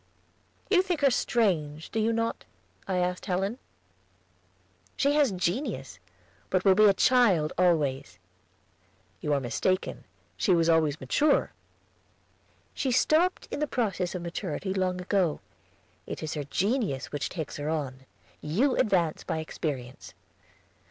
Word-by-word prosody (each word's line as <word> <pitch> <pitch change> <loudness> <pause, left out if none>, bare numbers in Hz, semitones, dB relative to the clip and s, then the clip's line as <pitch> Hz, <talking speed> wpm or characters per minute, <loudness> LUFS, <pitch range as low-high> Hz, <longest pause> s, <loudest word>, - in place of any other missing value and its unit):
"You 370 -3 +6
think 360 -5 -2
her 275 -2 +5
strange, 160 -12 0
do 225 - -1
you 220 +1 +2
not?" 230 0 -1 0.4
I 190 -2 0
asked 180 +2 -1
Helen. 195 +6 -1 1.4
"She 280 +1 +2
has 290 -5 +3
genius, 185 - -3 0.5
but 185 +1 0
will 195 - +7
be 215 +3 +5
a 200 - +6
child 200 -13 +3
always." 145 - +1 1.0
"You 150 - -3
are 145 - +3
mistaken; 185 +9 -1 0.3
she 185 - +2
was 165 0 +2
always 160 -2 +2
mature." 295 +7 +2 1.2
"She 265 - -1
stopped 320 +8 +2
in - - -3
the 300 - 0
process 195 -9 -1
of 180 - -4
maturity 180 +2 -3
long 185 -1 -1
ago. 180 -3 0 0.7
It - - -6
is 155 - -3
her 150 -2 -4
genius 195 - -1
which 145 -1 -3
takes 160 -5 -5
her 145 +1 -3
on. 135 -4 -4 0.3
You 225 - +1
advance 175 -7 +1
by - - -3
experience." 140 -5 -5
180 Hz, 135 wpm, -28 LUFS, 155-230 Hz, 1.4 s, will